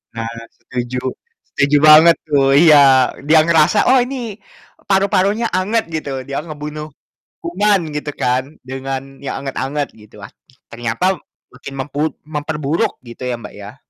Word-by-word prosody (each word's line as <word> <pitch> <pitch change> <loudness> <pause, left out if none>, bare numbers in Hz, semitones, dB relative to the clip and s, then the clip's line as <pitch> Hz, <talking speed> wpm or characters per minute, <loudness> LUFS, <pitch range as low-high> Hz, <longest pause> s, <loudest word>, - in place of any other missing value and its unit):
Nah 115 0 -4 0.3
setuju. 125 0 -4 0.5
Setuju 140 +1 +3
banget 160 +2 +8
tuh. 135 -2 +3
Iya, 155 -1 +7 0.4
e - - -13
dia 160 +1 +6
ngerasa, 165 +4 +3
"Oh 260 - +6
ini 260 +2 -3 0.7
paru-parunya 200 +3 +2
anget," 205 +5 0
gitu, 155 -3 -4 0.2
"dia 140 - -4
ngebunuh 150 -1 -7 0.5
kuman," 195 +3 +1 0.2
gitu 150 0 -4
kan 125 +1 +1 0.2
dengan 135 +1 -6
yang 140 - -5
anget-anget 140 +1 -3
gitu, 105 -1 -17
wah, - - -12 0.4
ternyata 120 +5 -3 0.5
makin 135 - -10
memput 145 +3 -2
memperburuk 150 0 -2
gitu 120 +1 -11
ya, 125 - -2
Mbak, - - -10
ya. 105 +4 -10
150 Hz, 140 wpm, -17 LUFS, 135-170 Hz, 0.7 s, banget